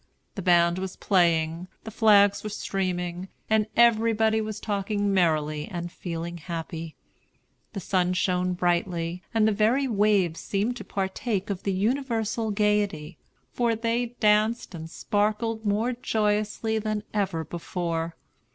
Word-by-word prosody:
The 195 - -5
band 175 0 +4
was 190 -1 -5
playing, 170 -2 +1 0.2
the 220 - -7
flags 205 -2 +4
were 215 - -3
streaming, 180 -3 -3 0.2
and 220 -1 +3
everybody 225 -1 +4
was 215 -1 -4
talking 205 -1 -1
merrily 155 -4 +1
and 175 -3 -5
feeling 170 -1 -5
happy. 165 -1 -6 0.8
The 195 - -4
sun 180 0 +1
shone 180 0 +1
brightly, 175 -1 -1
and 220 -1 +3
the - - +3
very 225 +7 +2
waves 205 -7 +2
seemed 210 +5 -1
to - - -7
partake 195 +1 -2
of 190 - -4
the 200 - -1
universal 225 +1 -1
gayety, 205 -7 0 0.3
for 235 -2 +1
they 235 +2 -1
danced 215 +1 +2
and 160 -1 -7
sparkled 215 +4 -1
more 220 +5 +1
joyously 215 -1 0
than 215 -1 -2
ever 190 -6 -1
before. 170 0 -3
200 Hz, 135 wpm, -26 LUFS, 175-220 Hz, 0.8 s, band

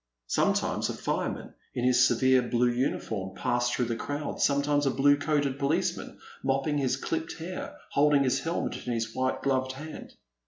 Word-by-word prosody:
Sometimes - - +1
a - - -3
fireman, - - -3 0.2
in 125 - -1
his 125 0 +5
severe 130 +2 +4
blue 120 0 +1
uniform, 110 -6 -2
passed 120 +1 0
through 125 - 0
the 115 0 -2
crowd, 145 +5 -4
sometimes 145 0 +2
a - - +4
blue 140 +2 +4
coated 145 -2 0
policeman, 140 +3 -1 0.3
mopping 135 +2 +1
his 130 -1 +1
clipped 160 +3 -3
hair, 175 +3 -6
holding 145 -1 +4
his 130 0 +1
helmet 165 -3 -3
in 120 - 0
his 115 -1 -2
white 130 0 -1
gloved 130 -1 +1
hand. 155 +4 -9
135 Hz, 165 wpm, -28 LUFS, 125-145 Hz, 0.3 s, his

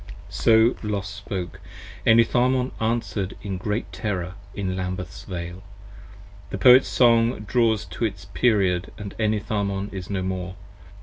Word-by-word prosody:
So 115 +2 +4
Los 100 -2 -2
spoke. 100 -3 -6 0.5
Enitharmon 125 +3 +4
answer'd 110 -4 -1
in 95 -3 -4
great 105 +4 -3
terror 95 -4 -3 0.2
in 95 -2 -2
Lambeth's 90 0 -5
Vale 90 -1 -6 0.9
The - - -4
Poet's 125 +7 +7
Song 115 -2 +3
draws 110 0 +1
to 115 - -3
its 100 -2 -4
period 95 -7 +1
& - - -20 0.2
Enitharmon 100 -2 -1
is 95 -2 -6
no 95 -2 -2
more. 95 0 -4
100 Hz, 125 wpm, -24 LUFS, 95-115 Hz, 0.9 s, Poet's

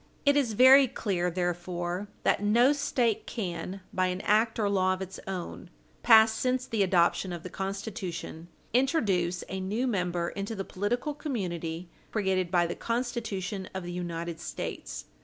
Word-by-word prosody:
It 285 0 +5
is 265 -6 +2
very 260 +4 +8
clear, 190 -8 -1
therefore, 175 +1 -2 0.2
that - - +2
no 235 +7 +4
State 240 -6 0
can, 185 -2 -4
by 185 0 +1
any 180 +1 -4
act 220 +2 +3
or 215 -2 +1
law 185 -2 +2
of 185 - -10
its 190 0 -9
own, 185 -1 -5 0.3
passed 220 -1 +6
since 255 0 0
the 225 -4 -1
adoption 185 0 +2
of 170 -2 -6
the 180 - -7
Constitution, 190 -4 -5 0.3
introduce 200 - +1
a 190 - -4
new 205 +7 -1
member 180 -7 -1
into 200 +3 -4
the 195 -1 -4
political 240 +9 -2
community 180 - -4 0.2
created 190 -4 0
by 175 -1 +3
the 170 - -2
Constitution 225 -5 -3
of 190 - -3
the 175 - -5
United 170 -1 -4
States. - - -6
195 Hz, 160 wpm, -29 LUFS, 175-230 Hz, 0.3 s, very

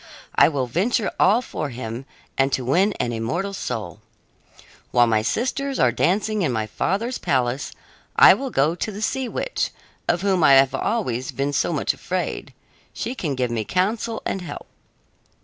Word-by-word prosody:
I - - +6
will 140 -4 -1
venture 195 - 0
all 215 +7 +4
for 150 - -4
him 120 +1 -6 0.3
and 135 +1 +2
to 130 - 0
win 185 - +3
an 120 - -2
immortal 150 - -2
soul. - - -5 0.9
While 120 -1 +5
my 110 -2 +2
sisters 265 - -1
are - - +4
dancing 210 +3 +1
in 160 - +1
my 110 -2 -1
father's 205 - -2
palace 130 +1 0 0.4
I - - +9
will 270 0 -3
go 150 - +2
to 180 +5 -3
the 210 +2 -6
sea 260 +2 -1
witch, - - -2 0.4
of 175 - +1
whom 190 -4 +2
I 140 - +7
have 135 0 +6
always 130 - -1
been 140 +1 -2
so - - +1
much - - 0
afraid; - - -4 0.4
she 240 - -3
can 155 - -3
give 125 -2 -1
me 115 -2 -1
counsel 215 - -1
and 195 - -2
help." 175 - -7
170 Hz, 170 wpm, -23 LUFS, 125-215 Hz, 0.9 s, I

